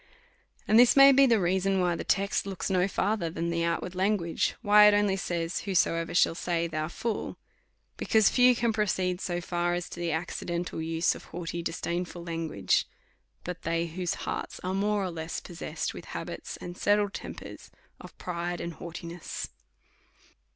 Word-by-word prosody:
And 220 - +6
this 245 0 +7
may 275 0 +9
be 275 0 +6
the 230 -3 +4
reason, 190 +1 +1
why 175 -1 +2
the - - -4
text 200 0 0
looks 195 0 -3
no 185 0 +3
far 205 +2 0
ther 170 -5 -2
than 170 +1 -3
the 170 0 0
outward 170 +2 -1
language; 185 -3 0
why 210 0 +8
it 210 - +6
only 205 -2 +2
says. 170 -2 -2
Whosoever 165 -4 0
shall 170 - +4
say. 170 0 -1
Thou 155 -2 -2
fool; 220 +5 -4 0.6
because 220 -2 +3
few 250 0 +5
can 235 -1 +1
proceed 185 -4 0
so 175 -1 -2
far, 175 0 -1
as 175 0 -3
to - - -8
the 170 -1 -1
accidental 170 +1 -3
use 165 +1 +1
of - - -11
haughty, 170 0 -5
disdainful 175 +1 -3
language, 165 - 0 0.6
but 180 0 -6
they 165 0 0
whose 175 +1 -3
hearts - - -4
are 185 +1 -2
more 205 +1 +1
or 185 - -2
less 160 -1 -4
possessed 175 -2 -5
with - - -9
habits - - -6
and 175 0 -8
settled 205 -1 +2
tempers - - -8 0.3
of - - -13
pride 175 0 -3
and 170 0 -4
haughtiness. 170 0 -7
175 Hz, 170 wpm, -28 LUFS, 170-200 Hz, 0.6 s, may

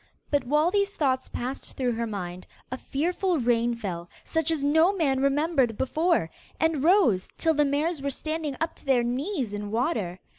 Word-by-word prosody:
But 285 -3 +1
while 300 +6 +2
these 405 0 +1
thoughts 260 -4 0
passed 255 +3 -5
through 255 -2 +1
her 230 0 -2
mind, 180 -4 -6 0.2
a 255 - -3
fearful 350 +5 -1
rain 240 -2 +1
fell, 175 -6 -5
such 320 -1 -1
as 315 -4 0
no 320 +5 +4
man 300 -9 +1
remembered 275 -4 +2
before, 310 - +1 0.3
and 320 -4 +1
rose 330 - +4
till 325 -1 +2
the 295 -1 +3
mares 295 +3 0
were 280 - -1
standing 310 0 -3
up 325 +1 -1
to - - -14
their 260 -3 +3
knees 255 - -2
in 205 0 -4
water. 220 - -1
275 Hz, 180 wpm, -26 LUFS, 235-320 Hz, 0.3 s, no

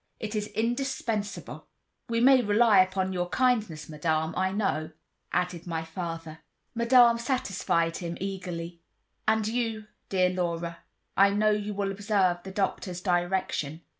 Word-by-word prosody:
It 220 -1 -4
is 210 -1 -2
indispensable." 230 -3 -2 0.4
"We 230 0 +1
may 260 +1 +7
rely 220 +1 +5
upon 185 0 0
your 175 -1 -2
kindness, 215 - +1
Madame, 160 +1 -1
I 190 0 +1
know," 165 -6 -1 0.4
added 180 -1 -1
my 165 -1 -2
father. 165 -1 -6 0.3
Madame 235 0 +5
satisfied 195 -9 0
him 170 -1 -5
eagerly. 180 -3 -5 0.5
"And 220 -1 +2
you, 225 -2 -2 0.2
dear 185 -1 +2
Laura, 170 -2 -2 0.4
I 195 +1 +6
know 210 +1 +2
you 210 0 -2
will 200 -1 -1
observe 195 -3 +1
the 190 - -8
doctor's 190 -2 -2
direction." 175 -4 -1
190 Hz, 135 wpm, -28 LUFS, 170-215 Hz, 0.5 s, may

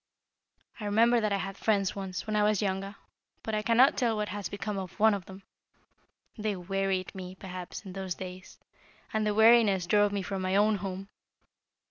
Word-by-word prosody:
I 210 - -5
remember 230 +3 +4
that 215 -1 0
I 200 - +2
had 195 0 -5
friends 200 -3 +1
once, 190 -2 -5
when 215 -1 -2
I 210 - +3
was 210 -1 +2
younger, 195 0 -2 0.5
but 220 - -4
I 215 - +1
cannot 235 +5 +4
tell 235 -4 +1
what 210 -1 -2
has 205 +1 -4
become 205 0 -4
of 190 +2 -8
one 220 0 +5
of 195 -3 -4
them. 190 0 -12 0.9
They 215 -2 -2
wearied 190 0 -2
me, 185 -1 -8
perhaps, 185 +1 -8
in 190 - -8
those 190 -2 -4
days, 185 0 -9 0.6
and 215 -1 +1
the 210 - 0
weariness 220 -4 +5
drove 205 +3 +3
me 200 -1 -2
from 195 0 -4
my 185 +1 0
own 210 +1 +3
home. 195 +1 -6
200 Hz, 190 wpm, -29 LUFS, 190-215 Hz, 0.9 s, one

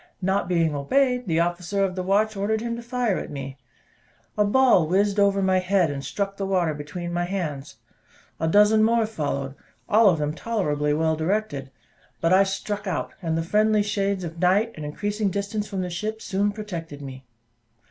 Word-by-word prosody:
Not 190 -1 0
being 165 -3 +1
obeyed, 250 - +1
the 165 -2 +1
officer 175 +3 -1
of 185 - -3
the 185 - -3
watch 205 +4 +1
ordered 205 +2 0
him 235 +1 -3
to 235 - -6
fire 240 -4 -1
at - - -7
me. 135 -1 -7 0.8
A 210 - +3
ball 205 -6 +4
whizzed 200 +4 +2
over 200 -1 +3
my 190 0 +3
head, 185 -3 +2
and 140 -1 -5
struck 200 +3 -3
the 195 - -2
water 180 -5 +1
between 175 +4 -6
my 175 0 0
hands. 155 -7 -4 0.6
A 160 - 0
dozen 210 +5 +5
more 230 0 +3
followed, 140 -9 -3 0.3
all 215 0 +6
of 175 - +2
them 150 0 -1
tolerably 150 -8 -1
well 160 0 +1
directed; 160 -4 -2 0.5
but 165 +2 +2
I 190 - +6
struck 205 +1 -4
out, 185 - -3
and 165 -2 -1
the 165 - 0
friendly 210 +3 +2
shades 200 -2 -1
of 165 0 -7
night, 195 +6 +3
and 155 - -7
increasing 205 +7 -2
distance 200 +2 -3
from 195 -2 -3
the 180 - -3
ship, 215 +5 -3
soon 200 0 0
protected 170 -9 -7
me. 130 -1 -9
190 Hz, 190 wpm, -24 LUFS, 165-210 Hz, 0.8 s, all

